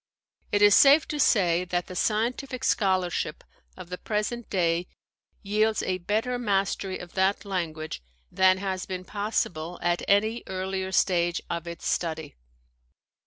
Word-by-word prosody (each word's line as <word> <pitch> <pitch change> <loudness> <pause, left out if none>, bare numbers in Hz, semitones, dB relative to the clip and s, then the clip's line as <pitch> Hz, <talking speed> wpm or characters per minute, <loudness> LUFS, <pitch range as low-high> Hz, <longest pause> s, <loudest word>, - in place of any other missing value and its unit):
It 205 0 +3
is 205 -1 +7
safe 285 +6 +7
to 300 - -3
say 180 -9 +3
that 175 0 -2
the 185 - -9
scientific 240 +6 -1
scholarship 185 -7 0 0.3
of 185 -2 -10
the 180 - -6
present 215 +2 -3
day 175 -2 +1 0.6
yields 215 +2 +1
a 185 0 -1
better 220 +7 -1
mastery 195 -3 -1
of 175 - -11
that 195 +2 +1
language 160 - -4 0.3
than 185 0 +4
has 190 -1 -3
been 185 -1 -5
possible 200 -5 -2
at 175 0 +1
any 215 +4 +2
earlier 190 0 -3
stage 175 -2 +2
of 170 0 -3
its 170 -1 -7
study. 160 -3 -2
190 Hz, 140 wpm, -26 LUFS, 175-210 Hz, 0.6 s, is